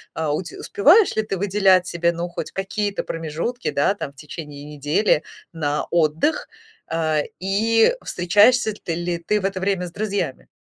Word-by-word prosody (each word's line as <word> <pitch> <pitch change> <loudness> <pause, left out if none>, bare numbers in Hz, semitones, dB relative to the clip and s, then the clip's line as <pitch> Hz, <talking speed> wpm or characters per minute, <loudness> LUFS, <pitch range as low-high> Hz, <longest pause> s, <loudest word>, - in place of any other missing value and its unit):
э. 160 - -2
У 150 +3 0
те 170 -3 -10
успеваешь 355 - +4
ли 220 - +2
ты 205 -2 -3
выделять 190 -1 +3
себе, 170 -1 0
ну, 170 +1 -4
хоть 175 - -6
какие-то 200 +1 -2
промежутки, 165 +9 -3
да, 145 +6 +2
там, 145 -8 -6
в - - -38
течение 145 0 -9
недели 150 +4 +1 0.3
на 150 -3 -1
отдых, 170 - +1 0.4
э, 155 -2 +1 0.2
и 220 - +3
встречаешься 210 +6 +3
ты 165 - -1
ли 175 0 -2
ты 205 +5 -1
в - - -3
это 195 -1 -1
время 190 -1 0
с - - -11
друзьями? 200 -8 -3
175 Hz, 170 wpm, -22 LUFS, 160-205 Hz, 0.4 s, успеваешь